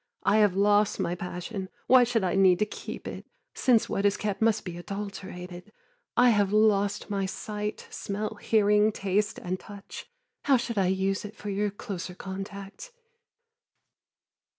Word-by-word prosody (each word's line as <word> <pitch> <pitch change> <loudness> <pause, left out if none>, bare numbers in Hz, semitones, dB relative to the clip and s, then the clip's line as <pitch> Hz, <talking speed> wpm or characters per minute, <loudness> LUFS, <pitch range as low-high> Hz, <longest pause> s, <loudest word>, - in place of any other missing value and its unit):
I 200 +2 +4
have 205 -4 +4
lost 205 +1 +3
my 170 - 0
passion: 180 +2 -5 0.2
why 255 -1 +7
should 230 -3 0
I 180 - +1
need 190 -2 +5
to 210 - +2
keep 210 - -8
it - - -7 0.3
Since 240 -4 +3
what 195 - -1
is 205 0 +3
kept 210 -1 -3
must 220 -1 +2
be 175 -2 -5
adulterated? 190 -1 -7 0.5
I 245 0 +6
have 205 -3 +2
lost 205 -1 +2
my 195 -1 0
sight, 210 +2 -5
smell, 210 +2 -3
hearing, 210 0 +4
taste 205 +2 -1
and 185 +1 -4
touch: 200 -1 -10 0.4
How 275 -2 +5
should 235 -3 -2
I 190 - +3
use 190 +1 0
it 210 +1 -8
for 210 -1 -5
your 205 +1 0
closer 195 -3 -6
contact? 195 - -7
205 Hz, 155 wpm, -28 LUFS, 190-215 Hz, 0.5 s, why